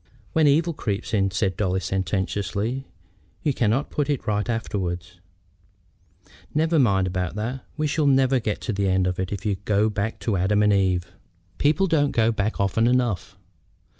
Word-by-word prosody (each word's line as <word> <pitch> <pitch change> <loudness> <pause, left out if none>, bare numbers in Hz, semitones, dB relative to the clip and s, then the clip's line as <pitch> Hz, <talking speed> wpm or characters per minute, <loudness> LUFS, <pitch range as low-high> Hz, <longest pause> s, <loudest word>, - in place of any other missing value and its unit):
"When 160 -2 +4
evil 160 +4 +3
creeps 110 -4 -3
in," 95 -2 +2
said 95 -1 -1
Dolly, 95 -1 0
sententiously, 100 +6 -2 0.6
"you 145 - +1
cannot 120 +3 0
put 145 -1 -1
it 145 -3 -1
right 105 +2 -1
afterward." 95 -6 -2 1.5
"Never 160 +1 +2
mind 100 -7 +3
about 90 -1 -2
that. 120 +5 -4
We 155 - 0
shall 150 0 +1
never 135 -1 +4
get 110 -3 -3
to 110 - -2
the 100 0 0
end 95 0 +2
if 95 +2 -3
you 100 -2 0
go 105 +1 +2
back 105 +2 -2
to 105 -5 0
Adam 105 +3 +2
and 105 0 +4
Eve." 90 -3 +1 0.5
"People 150 +6 +3
don't 150 -5 +2
go 115 0 +3
back 110 0 -2
often 100 +4 +2
enough." 120 -7 0
105 Hz, 165 wpm, -24 LUFS, 95-130 Hz, 1.5 s, When